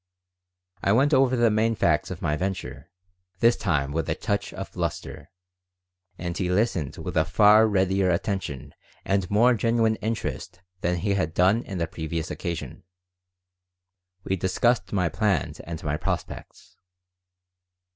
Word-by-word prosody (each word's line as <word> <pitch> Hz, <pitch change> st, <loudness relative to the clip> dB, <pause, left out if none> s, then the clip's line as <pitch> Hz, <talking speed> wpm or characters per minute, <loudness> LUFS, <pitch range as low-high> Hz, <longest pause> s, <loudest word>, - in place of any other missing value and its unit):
I 100 Hz, -, +2 dB
went 140 Hz, +6 st, +3 dB
over 130 Hz, -1 st, +4 dB
the 120 Hz, -2 st, +3 dB
main 110 Hz, +2 st, +2 dB
facts -, -, +1 dB
of -, -, -7 dB
my 75 Hz, -, +1 dB
venture, 95 Hz, +3 st, -4 dB, 0.5 s
this 115 Hz, 0 st, +5 dB
time 70 Hz, -1 st, -1 dB
with 80 Hz, +2 st, -2 dB
a -, -, 0 dB
touch -, -, -2 dB
of -, -, -7 dB
bluster. -, -, -5 dB, 0.9 s
And 85 Hz, 0 st, -4 dB
he 90 Hz, +1 st, -1 dB
listened 90 Hz, -, 0 dB
with -, -, -6 dB
far 105 Hz, +2 st, +6 dB
readier 95 Hz, -2 st, +2 dB
attention 85 Hz, -, -2 dB, 0.3 s
and 95 Hz, -2 st, 0 dB
more 120 Hz, +5 st, +4 dB
genuine 115 Hz, -1 st, +1 dB
interest 100 Hz, -5 st, -4 dB, 0.2 s
than 90 Hz, -1 st, 0 dB
he 100 Hz, 0 st, +1 dB
had 85 Hz, -5 st, -1 dB
done 95 Hz, +6 st, +3 dB
on 95 Hz, -, -4 dB
the 85 Hz, -, 0 dB
previous 80 Hz, +1 st, -4 dB
occasion. 85 Hz, -8 st, -5 dB, 1.4 s
We 95 Hz, -, -1 dB
discussed 95 Hz, +2 st, +1 dB
my 90 Hz, -4 st, +1 dB
plans 90 Hz, -1 st, -1 dB
and 85 Hz, 0 st, -7 dB
my 75 Hz, -1 st, -1 dB
prospects. -, -, -6 dB
95 Hz, 140 wpm, -25 LUFS, 85-110 Hz, 1.4 s, far